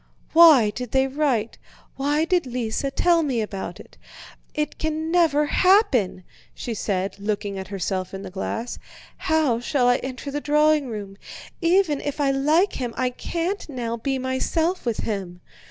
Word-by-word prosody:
"Why 310 Hz, -10 st, +7 dB
did 250 Hz, +1 st, -7 dB
they 265 Hz, 0 st, +4 dB
write, 265 Hz, -5 st, -1 dB, 0.4 s
why 290 Hz, +3 st, +1 dB
did 350 Hz, -4 st, +1 dB
Lise 240 Hz, -2 st, -2 dB
tell 340 Hz, -1 st, +4 dB
me 270 Hz, -6 st, -1 dB
about 195 Hz, -4 st, -5 dB
it? -, -, -15 dB, 0.6 s
It 300 Hz, 0 st, -2 dB
can 315 Hz, +1 st, -2 dB
never 320 Hz, -4 st, +3 dB
happen!" 295 Hz, -, +3 dB, 0.3 s
she 235 Hz, -, -4 dB
said, 195 Hz, -2 st, -2 dB
looking 200 Hz, -1 st, -3 dB
at 190 Hz, -, -6 dB
herself 190 Hz, -1 st, -3 dB
in 195 Hz, 0 st, -7 dB
the -, -, -8 dB
glass. 225 Hz, +5 st, -4 dB, 0.4 s
"How 315 Hz, -9 st, +1 dB
shall 245 Hz, +1 st, +1 dB
I 245 Hz, 0 st, +4 dB
enter 260 Hz, +2 st, -6 dB
the 290 Hz, +1 st, -3 dB
drawing 300 Hz, -1 st, +3 dB
room? 205 Hz, -3 st, -7 dB, 0.4 s
Even 340 Hz, -4 st, +2 dB
if 290 Hz, 0 st, -4 dB
I 280 Hz, -2 st, +2 dB
like 305 Hz, +8 st, +2 dB
him 245 Hz, -3 st, -4 dB
I 255 Hz, -1 st, 0 dB
can't 340 Hz, +8 st, -3 dB
now 240 Hz, -4 st, -3 dB
be 265 Hz, +4 st, -2 dB
myself 260 Hz, +6 st, -1 dB
with 230 Hz, -, -1 dB
him." 190 Hz, -5 st, -4 dB
265 Hz, 160 wpm, -23 LUFS, 220-310 Hz, 0.6 s, Why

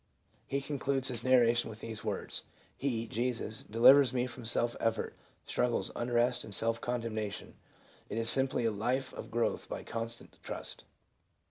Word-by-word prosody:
He 140 Hz, +1 st, -1 dB
concludes 135 Hz, -2 st, -1 dB
his 120 Hz, -2 st, -3 dB
narration 120 Hz, -2 st, +4 dB
with 110 Hz, 0 st, -9 dB
these 110 Hz, -2 st, -6 dB
words: -, -, -3 dB, 0.2 s
" -, -, -32 dB
He 115 Hz, -4 st, 0 dB
[Jesus] 115 Hz, -2 st, -2 dB
delivers 130 Hz, +4 st, +6 dB
me 125 Hz, 0 st, +1 dB
from 120 Hz, -1 st, -8 dB
self 120 Hz, +1 st, +1 dB
effort, 115 Hz, -1 st, -1 dB, 0.3 s
struggles, 120 Hz, -6 st, 0 dB
unrest 120 Hz, +1 st, +1 dB
and 100 Hz, -, -5 dB
self 115 Hz, +1 st, +1 dB
condemnation; 110 Hz, -5 st, -4 dB, 0.6 s
it 105 Hz, -, -4 dB
is 115 Hz, 0 st, 0 dB
simply 130 Hz, -1 st, +7 dB
a 115 Hz, -, +2 dB
life 125 Hz, +6 st, -2 dB
of -, -, -8 dB
growth 115 Hz, +1 st, -1 dB
by -, -, -5 dB
constant 115 Hz, 0 st, -6 dB
trust." -, -, -6 dB
120 Hz, 155 wpm, -32 LUFS, 115-125 Hz, 0.6 s, simply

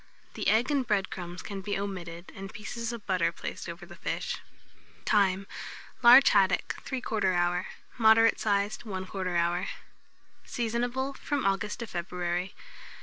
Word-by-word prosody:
The -, -, -3 dB
egg 235 Hz, +6 st, +3 dB
and 280 Hz, -2 st, +2 dB
bread 200 Hz, -3 st, +1 dB
crumbs 175 Hz, -1 st, -6 dB
can 200 Hz, -1 st, -5 dB
be 200 Hz, +1 st, -2 dB
omitted, 180 Hz, -3 st, -6 dB
and 195 Hz, 0 st, -8 dB
pieces 230 Hz, +2 st, -5 dB
of 235 Hz, -3 st, -7 dB
butter 185 Hz, -3 st, +2 dB
placed -, -, -6 dB
over -, -, -8 dB
the -, -, -12 dB
fish. -, -, -3 dB, 0.7 s
Time. 195 Hz, -1 st, +3 dB, 0.6 s
Large 250 Hz, +3 st, +9 dB
haddock, 195 Hz, -2 st, +3 dB
3/4 215 Hz, -7 st, 0 dB
hour; 175 Hz, 0 st, +1 dB, 0.3 s
moderate 225 Hz, 0 st, +6 dB
size, 205 Hz, 0 st, +1 dB
1/4 190 Hz, -3 st, -3 dB
hour. 175 Hz, +2 st, +1 dB, 0.8 s
Seasonable 245 Hz, +3 st, -2 dB
from 285 Hz, 0 st, -2 dB
August 200 Hz, +3 st, 0 dB
to -, -, -2 dB
February. 175 Hz, 0 st, -3 dB
200 Hz, 140 wpm, -29 LUFS, 185-230 Hz, 0.8 s, Large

